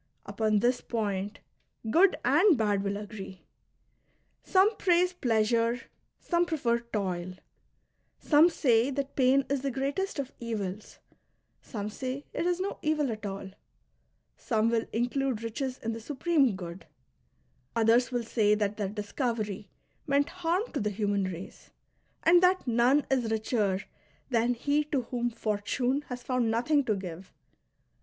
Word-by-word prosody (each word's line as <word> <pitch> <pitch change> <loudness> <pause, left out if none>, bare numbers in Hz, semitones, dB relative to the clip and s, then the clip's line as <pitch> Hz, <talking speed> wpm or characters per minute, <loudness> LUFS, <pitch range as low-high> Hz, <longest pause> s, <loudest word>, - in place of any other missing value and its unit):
Upon 215 -2 +1
this 245 +1 +2
point 205 -2 -3 0.5
good 370 - +5
and 385 -8 +5
bad 205 -3 +1
will 200 0 -2
agree. 205 -3 -8 1.0
Some 395 +3 +3
praise 360 0 +3
pleasure, 230 -4 +1 0.4
some 345 -1 +1
prefer 245 -8 +1
toil; 185 -6 -3 0.8
some 310 +3 +5
say 245 -6 +2
that 280 0 -3
pain 265 +1 +4
is 280 -1 -1
the 275 - -1
greatest 280 +10 -2
of 275 -2 -3
evils, 210 -4 -5 0.6
some 205 -2 -5
say 260 +5 -5
it 345 - -1
is 355 0 +1
no 390 +2 -3
evil 305 -4 +1
at 215 -1 -5
all; 195 -1 -6 0.8
some 225 -2 0
will 230 -1 +1
include 245 0 -1
riches 255 +3 -3
in 230 - -4
the 225 - -7
Supreme 280 - +1
Good, 175 -2 -8 0.9
others 230 +2 +3
will 245 -1 -1
say 215 -2 +2
that 210 -1 -1
their 205 -3 -2
discovery 210 -1 -3 0.4
meant 285 0 +2
harm 360 +2 0
to 290 - -2
the 210 - 0
human 205 -1 0
race, 185 0 -8 0.5
and 345 +2 +6
that 370 +1 +3
none 245 +4 +3
is 250 -4 +1
richer 215 -3 0 0.5
than 240 +1 +2
he 290 +5 +1
to 280 -4 -1
whom 240 0 -2
Fortune 230 +4 -1
has 250 -1 -6
found 250 -3 0
nothing 265 +6 +2
to 215 - +1
give. 185 -1 -7
235 Hz, 140 wpm, -29 LUFS, 210-280 Hz, 1.0 s, and